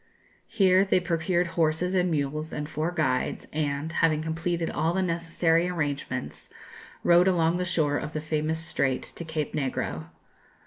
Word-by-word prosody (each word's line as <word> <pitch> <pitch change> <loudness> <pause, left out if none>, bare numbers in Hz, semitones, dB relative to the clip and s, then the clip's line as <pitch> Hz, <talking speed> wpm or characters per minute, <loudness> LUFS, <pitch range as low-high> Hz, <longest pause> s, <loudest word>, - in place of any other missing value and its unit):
Here 190 -3 +4
they 190 -2 +3
procured 175 0 0
horses 165 +2 +1
and 180 -1 +2
mules 155 +1 -2
and 150 0 -4
four 155 +2 -2
guides, 135 -7 -1
and, 145 0 -1
having 155 -2 +2
completed 165 +1 -2
all 165 +2 0
the 190 - +1
necessary 165 0 +1
arrangements, 145 -6 -3 0.5
rode 175 +1 +5
along 170 -2 +2
the 180 - -1
shore 155 -5 +1
of 150 - -5
the 155 - -2
famous 155 +1 -1
Strait 140 -5 0
to - - -8
Cape 160 -2 -3
Negro. 80 - -2
160 Hz, 150 wpm, -27 LUFS, 150-175 Hz, 0.5 s, rode